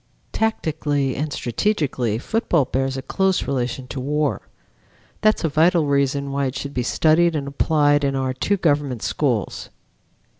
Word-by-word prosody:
Tactically 150 Hz, -, -1 dB
and 150 Hz, +2 st, -3 dB
strategically 130 Hz, -, -1 dB
football 170 Hz, -, 0 dB
bears 135 Hz, +1 st, -1 dB
a 135 Hz, -, -5 dB
close 190 Hz, -1 st, 0 dB
relation 130 Hz, -1 st, -2 dB
to 135 Hz, -, -5 dB
war. 145 Hz, +2 st, -1 dB, 0.8 s
That 215 Hz, 0 st, +4 dB
is -, -, -8 dB
a 165 Hz, -, +1 dB
vital 160 Hz, +2 st, +3 dB
reason 140 Hz, 0 st, 0 dB
why 140 Hz, 0 st, 0 dB
it 130 Hz, -, -5 dB
should 140 Hz, 0 st, -5 dB
be 125 Hz, -, -1 dB
studied 160 Hz, +6 st, +3 dB
and 140 Hz, -2 st, -2 dB
applied 145 Hz, 0 st, +2 dB
in 135 Hz, -1 st, 0 dB
our 130 Hz, -1 st, -1 dB
two 200 Hz, +10 st, 0 dB
government 145 Hz, -, 0 dB
schools. 125 Hz, -8 st, -1 dB
140 Hz, 155 wpm, -22 LUFS, 135-155 Hz, 0.8 s, That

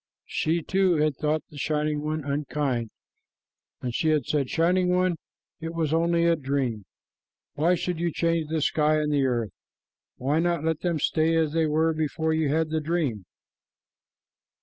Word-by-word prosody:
She, 165 Hz, +1 st, -1 dB
too, 190 Hz, 0 st, +2 dB
had 150 Hz, -2 st, +1 dB
thought 155 Hz, +2 st, -1 dB
the 145 Hz, -, -9 dB
Shining 150 Hz, 0 st, 0 dB
One 155 Hz, 0 st, -2 dB
unkind, 140 Hz, -4 st, -2 dB, 0.9 s
and 125 Hz, -2 st, -2 dB
she 160 Hz, -, +1 dB
had 150 Hz, -5 st, +2 dB
said, 140 Hz, -4 st, 0 dB
"Shining 180 Hz, +2 st, +2 dB
One, 180 Hz, -1 st, +2 dB, 0.4 s
it 165 Hz, +1 st, -6 dB
was 160 Hz, -2 st, 0 dB
only 170 Hz, +1 st, +2 dB
a 170 Hz, 0 st, +4 dB
dream. 135 Hz, -, -2 dB, 0.7 s
Why 170 Hz, +5 st, +2 dB
should 175 Hz, -1 st, -3 dB
you 170 Hz, 0 st, 0 dB
change 165 Hz, -1 st, 0 dB
the 160 Hz, -2 st, 0 dB
sky 155 Hz, 0 st, +2 dB
and 150 Hz, -1 st, 0 dB
the 140 Hz, -2 st, +2 dB
earth? 120 Hz, -5 st, -1 dB, 0.7 s
Why 140 Hz, +5 st, 0 dB
not 170 Hz, -2 st, 0 dB
let 160 Hz, -1 st, 0 dB
them 175 Hz, -3 st, -1 dB
stay 160 Hz, +2 st, +1 dB
as 160 Hz, -2 st, +1 dB
they 165 Hz, -1 st, +2 dB
were 160 Hz, +2 st, +2 dB
before 160 Hz, +1 st, -1 dB
you 160 Hz, -2 st, +1 dB
had 160 Hz, +1 st, 0 dB
the 160 Hz, 0 st, 0 dB
dream?" 150 Hz, -, -1 dB
155 Hz, 170 wpm, -26 LUFS, 145-165 Hz, 0.9 s, a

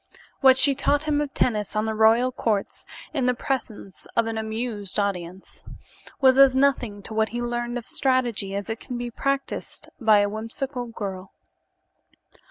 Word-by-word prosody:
What 265 Hz, -1 st, +6 dB
she 280 Hz, +1 st, +7 dB
taught 285 Hz, +2 st, +1 dB
him 300 Hz, -1 st, 0 dB
of 290 Hz, -2 st, -3 dB
tennis 210 Hz, -5 st, 0 dB
on 215 Hz, +1 st, +1 dB
the 220 Hz, -, -1 dB
royal 225 Hz, +4 st, +4 dB
courts, 215 Hz, -5 st, -2 dB, 0.3 s
in 265 Hz, -5 st, 0 dB
the 250 Hz, -, +2 dB
presence 225 Hz, -7 st, -5 dB
of 230 Hz, -, +3 dB
an 225 Hz, 0 st, -3 dB
amused 220 Hz, -2 st, -4 dB
audience, 190 Hz, -2 st, -4 dB, 0.6 s
was 265 Hz, -1 st, +5 dB
as 270 Hz, -1 st, +7 dB
nothing 245 Hz, -7 st, +1 dB
to 220 Hz, -, -7 dB
what 220 Hz, 0 st, +1 dB
he 240 Hz, -, -4 dB
learned 240 Hz, 0 st, -3 dB
of 235 Hz, -, -7 dB
strategy 240 Hz, -7 st, 0 dB
as 200 Hz, 0 st, -4 dB
it 225 Hz, 0 st, -4 dB
can 250 Hz, -3 st, -6 dB
be 240 Hz, 0 st, -5 dB
practiced 275 Hz, +3 st, -3 dB
by 215 Hz, -4 st, +5 dB
a 205 Hz, -, +2 dB
whimsical 240 Hz, +4 st, -5 dB
girl. 195 Hz, -4 st, -7 dB
235 Hz, 170 wpm, -24 LUFS, 215-260 Hz, 0.6 s, she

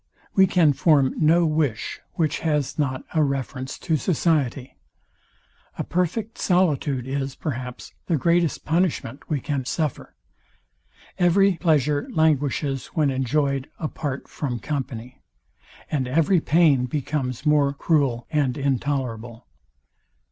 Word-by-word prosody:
We 190 Hz, -1 st, +5 dB
can 170 Hz, -5 st, +4 dB
form 140 Hz, -3 st, +3 dB
no 165 Hz, +2 st, +4 dB
wish, 150 Hz, -9 st, -1 dB
which 155 Hz, -2 st, 0 dB
has 150 Hz, -3 st, -1 dB
not 130 Hz, -3 st, -1 dB
a 160 Hz, -, +3 dB
reference 135 Hz, -1 st, -3 dB
to 160 Hz, -3 st, 0 dB
society. 140 Hz, -5 st, 0 dB, 1.0 s
A -, -, -2 dB
perfect 200 Hz, +6 st, -2 dB
solitude 150 Hz, -8 st, +1 dB
is, 135 Hz, 0 st, -3 dB
perhaps, 125 Hz, -4 st, -6 dB
the 165 Hz, -, +2 dB
greatest 170 Hz, +1 st, +1 dB
punishment 160 Hz, -5 st, -1 dB
we 150 Hz, -3 st, 0 dB
can 140 Hz, 0 st, -2 dB
suffer. 155 Hz, 0 st, -3 dB, 1.0 s
Every 190 Hz, +2 st, +4 dB
pleasure 150 Hz, -3 st, +1 dB
languishes 145 Hz, -3 st, +1 dB
when 150 Hz, -4 st, +2 dB
enjoyed 135 Hz, +1 st, 0 dB
a 155 Hz, -, -2 dB
part 145 Hz, -3 st, -5 dB
from 130 Hz, -5 st, -4 dB
company, 125 Hz, 0 st, -5 dB, 0.7 s
and 135 Hz, -4 st, 0 dB
every 165 Hz, +7 st, +3 dB
pain 150 Hz, -6 st, +3 dB
becomes 135 Hz, -1 st, -3 dB
more 150 Hz, -2 st, +4 dB
cruel 140 Hz, -5 st, 0 dB
and 140 Hz, -5 st, +1 dB
intolerable. 130 Hz, -4 st, -2 dB
145 Hz, 120 wpm, -23 LUFS, 130-160 Hz, 1.0 s, We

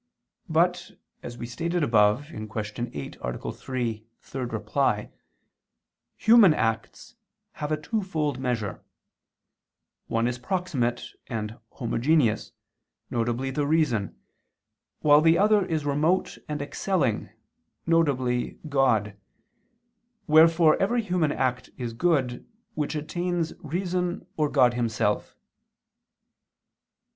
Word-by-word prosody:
But, -, -, +1 dB, 0.3 s
as 120 Hz, -, -8 dB
we -, -, -5 dB
stated 170 Hz, +7 st, -2 dB
above 115 Hz, +3 st, +3 dB
(Q. 110 Hz, -9 st, -7 dB
8, 105 Hz, -, -5 dB
A. 60 Hz, 0 st, -4 dB
3, 115 Hz, -4 st, -4 dB, 0.3 s
ad 120 Hz, -5 st, -4 dB
3) 105 Hz, -4 st, 0 dB, 1.0 s
human 220 Hz, -7 st, +7 dB
acts 115 Hz, 0 st, -2 dB, 0.4 s
have 150 Hz, +1 st, -5 dB
a 155 Hz, -, 0 dB
twofold 155 Hz, -, -2 dB
measure; 120 Hz, -6 st, -2 dB, 1.3 s
one 115 Hz, +1 st, 0 dB
is 125 Hz, 0 st, -3 dB
proximate 135 Hz, -7 st, -1 dB, 0.2 s
and 110 Hz, -1 st, -4 dB, 0.2 s
homogeneous, 120 Hz, 0 st, +1 dB, 0.6 s
viz. 120 Hz, +3 st, -1 dB
the 145 Hz, +1 st, 0 dB
reason, 145 Hz, -10 st, +1 dB, 0.8 s
while 150 Hz, 0 st, +6 dB
the 165 Hz, +1 st, +5 dB
other 210 Hz, 0 st, +4 dB
is 155 Hz, -4 st, -2 dB
remote 155 Hz, +6 st, +1 dB
and 150 Hz, -1 st, -2 dB
excelling, 145 Hz, -, -1 dB, 0.6 s
viz. 135 Hz, -7 st, +1 dB
God: 115 Hz, -7 st, +2 dB, 1.1 s
wherefore 160 Hz, 0 st, +5 dB
every 230 Hz, +4 st, +1 dB
human 180 Hz, -6 st, +1 dB
act 125 Hz, -2 st, -1 dB
is 120 Hz, -3 st, -4 dB
good, 130 Hz, -3 st, 0 dB, 0.3 s
which 150 Hz, +1 st, -2 dB
attains 175 Hz, +2 st, -2 dB
reason 180 Hz, +2 st, -2 dB
or 150 Hz, -2 st, +1 dB
God 125 Hz, -4 st, +4 dB
Himself. 110 Hz, -3 st, -1 dB
140 Hz, 100 wpm, -26 LUFS, 120-165 Hz, 1.3 s, human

